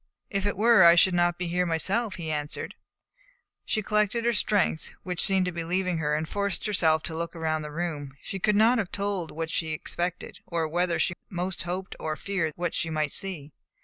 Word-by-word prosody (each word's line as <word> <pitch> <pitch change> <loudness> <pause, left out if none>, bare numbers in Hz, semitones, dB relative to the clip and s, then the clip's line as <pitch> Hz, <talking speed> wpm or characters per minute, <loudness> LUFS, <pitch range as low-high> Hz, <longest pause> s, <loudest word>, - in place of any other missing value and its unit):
"If 200 0 0
it 205 - -2
were, 225 -2 +6
I 170 0 +9
should 185 +2 +5
not 175 0 +2
be 180 - -3
here 180 +1 +1
myself," 195 +7 0
he 160 -3 -4
answered. 150 -1 -3 0.9
She 215 - -1
collected 210 +3 +1
her 235 - +3
strength, 200 -7 +1
which 180 -4 -1
seemed 190 -1 +3
to 180 - -1
be 170 -1 -4
leaving 180 0 0
her, 150 -1 +1
and 155 +1 -2
forced 200 0 -2
herself 160 -7 +2
to 160 - -4
look 170 +1 -4
around 160 -1 -1
the 150 - -6
room. 150 -4 -4
She 195 - -5
could 210 +2 +2
not 230 +3 +5
have 195 -5 -2
told 200 -4 -2
what 165 +1 -4
she 165 - -1
expected, 175 +3 -3
or 165 -2 -1
whether 175 +2 0
she - - +1 0.2
most 180 0 -2
hoped 185 +2 -4
or 155 -1 -2
feared 170 -4 -2
what 175 -1 -2
she 165 - -1
might 155 -2 -1
see. 165 -7 -5
175 Hz, 210 wpm, -27 LUFS, 160-195 Hz, 0.9 s, I